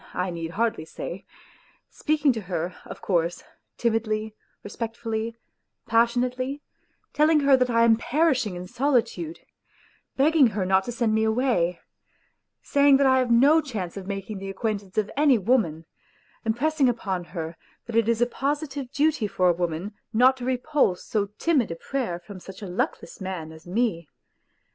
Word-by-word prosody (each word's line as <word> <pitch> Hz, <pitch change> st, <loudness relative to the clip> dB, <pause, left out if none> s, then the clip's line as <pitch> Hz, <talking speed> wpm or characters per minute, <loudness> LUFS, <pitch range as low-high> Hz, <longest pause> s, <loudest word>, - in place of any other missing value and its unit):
need 165 Hz, -1 st, -5 dB
hardly 230 Hz, -4 st, 0 dB
say; 175 Hz, +3 st, -7 dB, 0.7 s
speaking 300 Hz, -3 st, +1 dB
to 225 Hz, -, -4 dB
her, 180 Hz, -2 st, -3 dB
of -, -, -10 dB
course, 170 Hz, -2 st, 0 dB, 0.3 s
timidly, 220 Hz, -2 st, -1 dB, 0.3 s
respectfully, 225 Hz, +1 st, -4 dB, 0.5 s
passionately; 245 Hz, +4 st, +1 dB, 0.5 s
telling 305 Hz, +1 st, +4 dB
her 280 Hz, -1 st, +6 dB
that 255 Hz, -1 st, +1 dB
I 230 Hz, -1 st, +3 dB
am 230 Hz, -1 st, +6 dB
perishing 255 Hz, -, +1 dB
in 175 Hz, +1 st, -6 dB
solitude, 280 Hz, -, -1 dB, 0.8 s
begging 290 Hz, 0 st, +5 dB
her 205 Hz, -4 st, -2 dB
not 190 Hz, +1 st, +3 dB
to -, -, -4 dB
send 235 Hz, -2 st, 0 dB
me 220 Hz, 0 st, +2 dB
away; 220 Hz, -7 st, +1 dB, 0.8 s
saying 280 Hz, -1 st, +5 dB
that 280 Hz, -, +3 dB
I 260 Hz, 0 st, +5 dB
have 255 Hz, -1 st, 0 dB
no 280 Hz, +7 st, +5 dB
chance 210 Hz, -, -5 dB
of 195 Hz, -2 st, -7 dB
making 195 Hz, +1 st, -5 dB
the 195 Hz, 0 st, -6 dB
acquaint 205 Hz, +1 st, -2 dB
ance 195 Hz, -1 st, -19 dB
of 210 Hz, -1 st, 0 dB
any 285 Hz, -3 st, +4 dB
woman; 190 Hz, -7 st, +1 dB, 0.6 s
impressing 265 Hz, +5 st, +2 dB
upon 190 Hz, -6 st, -2 dB
her 165 Hz, -2 st, -6 dB, 0.3 s
that 235 Hz, -, -6 dB
it 230 Hz, -1 st, +3 dB
is 230 Hz, 0 st, +3 dB
a -, -, +4 dB
positive 280 Hz, +1 st, -3 dB
duty 290 Hz, -5 st, +1 dB
for 185 Hz, -2 st, +2 dB
a -, -, +4 dB
woman 175 Hz, +3 st, -3 dB, 0.2 s
not 250 Hz, +4 st, +5 dB
to 245 Hz, -, -6 dB
repulse 255 Hz, -6 st, +1 dB
so 205 Hz, -2 st, 0 dB
timid 295 Hz, -10 st, +2 dB
a 165 Hz, -, -4 dB
prayer 225 Hz, -2 st, -3 dB
from 185 Hz, +2 st, -11 dB
such 190 Hz, +3 st, -11 dB
a -, -, -5 dB
luckless 235 Hz, -, -3 dB
man 180 Hz, -4 st, -5 dB
as 160 Hz, +1 st, -14 dB
me. 180 Hz, -5 st, -1 dB
230 Hz, 160 wpm, -25 LUFS, 190-260 Hz, 0.8 s, her